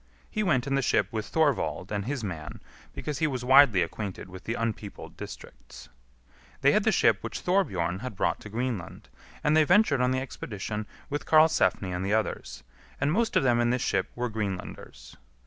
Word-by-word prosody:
He 215 - -1
went 135 - +2
in 140 - -2
the 135 - +2
ship - - +2
with 110 -2 -3
Thorvald 110 - 0
and 100 -1 -2
his 135 -1 -3
man, 80 -6 -6 0.3
because 150 -3 -5
he 155 - +2
was 130 -4 -3
widely 130 -8 +6
acquainted 100 -3 -6
with 95 +1 -11
the 115 - -2
unpeopled 110 -3 -5
districts. - - -11 0.7
They - - +5
had - - +2
the - - +4
ship - - +3
which - - -5
Thorbjorn 95 - 0
had 120 -1 -6
brought - - 0
to 105 - -10
Greenland, 115 -5 -4 0.3
and 150 +1 +3
they 155 - +6
ventured 175 -5 +4
on 125 - +3
the 130 0 +1
expedition 105 -4 -5 0.2
with 145 - -3
Karlsefni 155 - +4
and 90 +1 -3
the 100 +2 +1
others; 110 -1 -3 0.4
and 140 +2 +1
most 225 +3 +1
of - - +4
them 120 -2 +3
in 120 0 +2
this 125 0 0
ship - - 0
were 125 0 -1
Greenlanders. 95 - -6
120 Hz, 190 wpm, -27 LUFS, 100-140 Hz, 0.7 s, widely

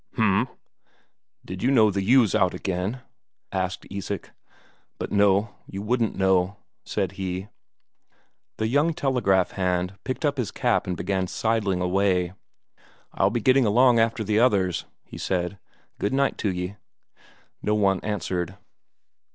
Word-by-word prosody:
"H'm. 110 0 +2 1.0
Did 95 +1 -7
you 125 - +2
know 110 -6 +5
that 100 0 -1
ewe's 115 +1 +4
out 90 - +2
again?" 95 +7 -3 0.5
asked 95 -1 -2
Isak. 100 0 -5 0.7
"But - - -5
no, 100 +1 +3
you 95 +1 -6
wouldn't 115 0 0
know," 95 0 +2 0.3
said 95 -4 -2
he. 95 +2 -3 1.1
The 110 - 0
young 145 +7 +2
telegraph 120 - +2
hand 90 -1 -1
picked 130 +4 -3
up 145 -1 +1
his 125 -6 -1
cap - - 0
and 90 -1 -2
began 95 0 -1
sidling 105 -3 0
away. 90 -1 +1 0.8
"I'll 95 - +3
be 115 +2 -2
getting 130 +1 +4
along 120 +2 +5
after 115 0 +1
the 105 0 +1
others," 100 -8 +2 0.2
he - - -11
said. 90 +1 -2 0.4
"Good 100 - -1
night 140 0 +2
to 100 - 0
ye." 90 +2 -4 0.8
No 105 - +1
one 100 -3 +2
answered. 95 -3 -3
100 Hz, 140 wpm, -25 LUFS, 95-115 Hz, 1.1 s, know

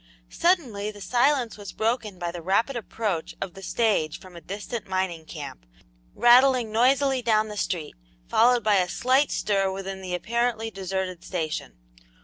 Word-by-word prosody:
Suddenly 255 - +1
the 205 -1 -10
silence 245 +1 +1
was 205 - -7
broken 220 -3 -1
by 175 -1 -3
the 175 0 -7
rapid 200 +10 +1
approach 210 -7 -3
of 195 -3 -5
the 195 - -11
stage 195 -6 0
from 185 -2 -14
a 170 - -9
distant 205 +7 -6
mining 185 -4 -2
camp, - - -8 0.5
rattling 245 -1 +5
noisily 265 +3 +3
down 220 -2 +2
the 210 - -6
street, 170 -6 -3 0.3
followed 240 0 +4
by 210 -1 +4
a 180 -1 +1
slight 260 +8 +2
stir 195 -2 0
within 190 0 -5
the 180 -1 -3
apparently 225 +2 -1
deserted 190 -2 -4
station. 160 -4 -3
210 Hz, 155 wpm, -25 LUFS, 185-240 Hz, 0.5 s, rattling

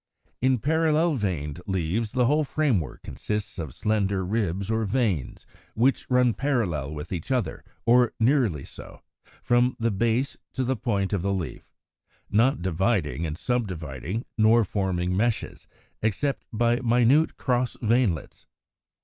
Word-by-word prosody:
128. 130 +1 +3
In - - +2
parallel 160 +3 +2
veined 90 - -3
leaves, 95 +4 -1
the 125 -1 +3
whole 150 +5 +3
framework 130 - -1
consists 105 -2 -4
of 75 -5 -4
slender 100 - 0
ribs 100 -1 -1
or 110 0 +1
veins, 105 - -1 0.3
which 125 +5 +1
run 125 -2 +4
parallel 100 - -1
with 75 +2 -7
each 85 +4 -5
other, 125 -5 -1 0.2
or 120 0 +5
nearly 115 - +2
so, - - -12 0.4
from 120 +1 +3
the 115 0 +1
base 115 +6 0 0.2
to 130 - -1
the 130 +1 0
point 105 -5 -1
of 100 - 0
the 100 +2 0
leaf, 95 -5 -4 0.6
not 115 -2 +3
dividing 85 - 0
and 75 +1 -5
subdividing, 90 - -3
nor 110 +1 +5
forming 90 -2 -1
meshes, 115 +3 -1 0.3
except 120 +6 -1
by 120 +1 +2
minute 125 +6 +3
cross 125 -1 0
veinlets. 110 - 0
110 Hz, 140 wpm, -26 LUFS, 95-125 Hz, 0.6 s, or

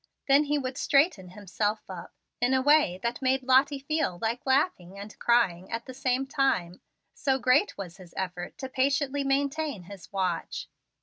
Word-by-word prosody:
Then 280 +2 +5
he 295 +1 +1
would 260 -1 -4
straighten 275 - +2
himself 210 +2 -3
up 180 -3 -8 0.3
in 250 +2 +3
a 260 - +2
way 290 - +4
that 235 +2 -2
made 260 0 +1
Lottie 265 +3 +4
feel 280 - -1
like 230 +5 -3
laughing 260 - +1
and 205 +1 -9
crying 190 -7 +2
at 230 0 -3
the 260 - -8
same 260 0 0
time, 265 - 0 0.3
so 265 -1 0
great 265 +10 +2
was 180 -3 -7
his 180 -3 -15
effort 180 -2 -4
to 265 - -5
patiently 275 +2 0
maintain 280 - -1
his 195 +1 -12
watch. 185 -4 -2
255 Hz, 170 wpm, -28 LUFS, 190-275 Hz, 0.3 s, Then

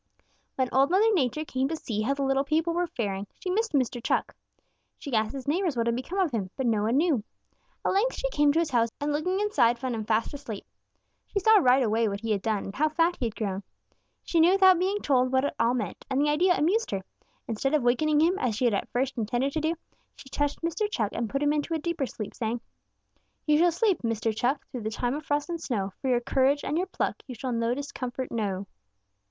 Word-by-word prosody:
"When 260 -1 +1
Old 270 +2 +4
Mother 425 +5 +4
Nature 305 - 0
came 260 -2 -1
to 325 - -2
see 220 -8 -3
how 270 +6 0
the 280 - -2
little 270 0 +2
people 320 +4 0
were 350 +1 0
faring, 200 -7 -3
she 365 - -3
missed 445 +2 0
Mr. 250 -3 0
Chuck. - - 0 0.6
She 280 - -8
asked 220 +1 +1
his 270 -2 -7
neighbors 330 -2 0
what 230 - +1
had 235 0 +1
become 260 +10 -5
of 370 -6 +2
him, 205 -6 -2
but 265 - -1
no 220 -3 +2
one 225 +5 +1
knew. 300 -8 +2 0.6
At - - +2
length 445 +6 +2
she - - -1
came 295 -5 +4
to 305 - 0
his 335 -3 +1
house 230 -2 +2
and 290 +1 -1
looking 360 +6 0
inside 245 - +3
found 255 0 -3
him 220 -1 -3
fast 220 +3 0
asleep. 270 -8 -7 0.6
She - - -5
saw 430 +2 +6
right 255 -4 +4
away 225 0 +2
what 200 0 -3
he 225 -1 -2
had 200 -2 +1
done 215 -1 -1
and 195 - -7
how 310 +2 +2
fat 335 +3 +1
he 245 - 0
had 220 - -7
grown. 200 -3 -3 0.6
She 335 - 0
knew 340 +3 +6
without 380 -2 +6
being 390 +3 0
told 255 -2 +2
what 260 +1 +2
it - - -1
all 235 +2 +3
meant, 210 -8 -4
and 265 0 0
the 295 +1 +3
idea 355 +4 +3
amused 395 +10 +1
her. 195 -1 -3 0.4
Instead 270 +6 0
of 295 - +1
wakening 295 +5 +3
him, 350 +4 +2
as 235 -4 0
she 245 - 0
had 235 - +3
at 200 - -2
first 260 0 -1
intended 240 +5 0
to 315 - -1
do, 320 +2 0 0.4
she 270 - -13
touched 290 +3 -2
Mr. 340 +6 -1
Chuck 220 - -1
and 230 -2 -2
put 275 +5 -1
him 290 0 +3
into 300 +2 -1
a - - +1
deeper 315 -3 -2
sleep, 215 -2 -7
saying: 230 0 -2 0.9
"'You 300 -1 +4
shall 350 +1 +5
sleep, 380 +2 +1
Mr. 225 -1 -1
Chuck, 250 +6 0
Through 250 - -5
the 215 - -2
time 245 +3 -2
of 300 +1 -6
frost 290 0 0
and 335 -1 -4
snow. 200 - -2
For 270 - -3
your 245 -1 +2
courage 270 +3 +2
and 295 - -2
your 365 +3 0
pluck - - -2
You 255 - -7
shall 255 +3 -4
no 230 +1 0
discomfort 260 -2 -5
know.' 200 -4 -2
270 Hz, 245 wpm, -27 LUFS, 230-320 Hz, 0.9 s, saw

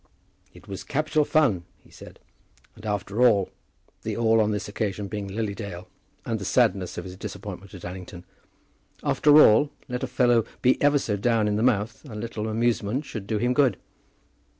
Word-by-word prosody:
"It - - -17
was 100 0 -6
capital 155 +1 +1
fun," 145 - +2 0.2
he - - -22
said; - - -13 0.6
"and 110 +1 -10
after 105 +2 -2
all," 105 -6 +4 0.5
the - - -4
"all" 115 -1 +4
on 105 - +2
this 105 -1 -2
occasion 105 -1 -3
being 105 -1 -5
Lily 105 +1 -3
Dale, 95 -3 -7 0.4
and 115 -1 -2
the - - -6
sadness 100 -4 +1
of - - -4
his 90 0 -8
disappointment 100 -2 -8
at 90 - -10
Allington, 90 -1 -8 0.8
"after 150 0 +5
all, 140 +2 +6 0.2
let 125 -1 -4
a 130 - -2
fellow 120 -2 +3 0.2
be 125 - +3
ever 145 0 +4
so 105 -7 -1
down 110 0 +2
in 105 - 0
the 105 - 0
mouth, 110 -3 0
a 110 - -8
little 110 0 -4
amusement 115 +3 0
should 110 -7 -7
do 110 - 0
him 120 +4 +1
good." 130 -7 +3
110 Hz, 180 wpm, -25 LUFS, 100-120 Hz, 0.8 s, all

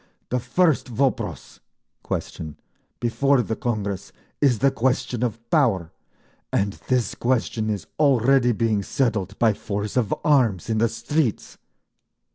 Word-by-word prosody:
The 125 - 0
first 150 +6 +2
vopros 130 +2 -2 0.4
(question) 75 -2 -5 0.4
before 125 +2 +2
the 110 - -2
Congress 105 -6 -3 0.3
is 135 -5 +4
the 135 +4 +3
question 125 -2 0
of 120 -3 -1
Power, 110 - +2 0.6
and 100 0 +1
this 125 -5 +1
question 115 -3 0
is 100 -6 -2
already 135 -3 +4
being 110 -2 +1
settled 100 -4 -1
by 115 -2 +4
force 105 0 -4
of 120 -5 +1
arms 115 - +2
in 110 - +1
the 115 +1 +3
streets! 145 -2 -2
120 Hz, 125 wpm, -23 LUFS, 105-130 Hz, 0.6 s, is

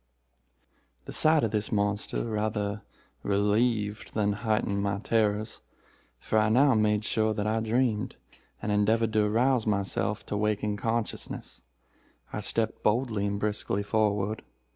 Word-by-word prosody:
"The - - -7
sight 155 -1 +5
of 110 - 0
this 105 -1 -1
monster 105 0 -1
rather 105 -2 -2 0.4
relieved 105 +1 0
than 105 -1 +1
heightened 105 -2 -1
my 100 -1 -1
terrors—for 105 - -3
I 110 0 +2
now 135 +5 +5
made 105 -1 +2
sure 110 -1 +1
that 105 - -2
I 110 +1 +1
dreamed, 110 -1 0 0.5
and 105 - -1
endeavored 110 +2 +2
to 105 -1 +3
arouse 115 +2 +2
myself 105 +1 -1
to - - -4
waking 105 0 0
consciousness. 115 +1 -3 0.7
I - - -3
stepped 115 -1 -1
boldly 110 -2 +1
and 100 0 -2
briskly 105 -1 -1
forward. 105 0 0
105 Hz, 130 wpm, -28 LUFS, 105-110 Hz, 0.7 s, sight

